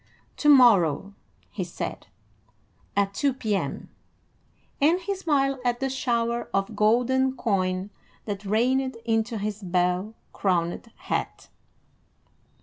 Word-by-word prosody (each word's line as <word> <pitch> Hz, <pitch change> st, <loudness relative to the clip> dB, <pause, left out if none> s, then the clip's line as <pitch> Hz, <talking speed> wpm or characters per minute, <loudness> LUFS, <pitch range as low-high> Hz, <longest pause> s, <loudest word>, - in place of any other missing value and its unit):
"To 295 Hz, -, +2 dB
morrow," 200 Hz, -, +5 dB, 0.4 s
he -, -, -3 dB
said, -, -, -6 dB, 0.9 s
"at 200 Hz, 0 st, +1 dB
two 275 Hz, +4 st, 0 dB
P.M.;" 215 Hz, -6 st, -2 dB, 0.9 s
and 325 Hz, +5 st, +4 dB
he 395 Hz, +2 st, -2 dB
smiled 275 Hz, -7 st, 0 dB
at 240 Hz, -1 st, 0 dB
the 270 Hz, -1 st, -1 dB
shower 235 Hz, -2 st, -1 dB
of 195 Hz, 0 st, -1 dB
golden 255 Hz, +4 st, +2 dB
coin 185 Hz, -2 st, -1 dB, 0.3 s
that 205 Hz, -1 st, -4 dB
rained 250 Hz, +5 st, +1 dB
into 225 Hz, 0 st, 0 dB
his 210 Hz, 0 st, -4 dB
bell 180 Hz, +3 st, 0 dB, 0.2 s
crowned 180 Hz, +3 st, -1 dB
hat. -, -, -4 dB
225 Hz, 110 wpm, -25 LUFS, 195-260 Hz, 0.9 s, morrow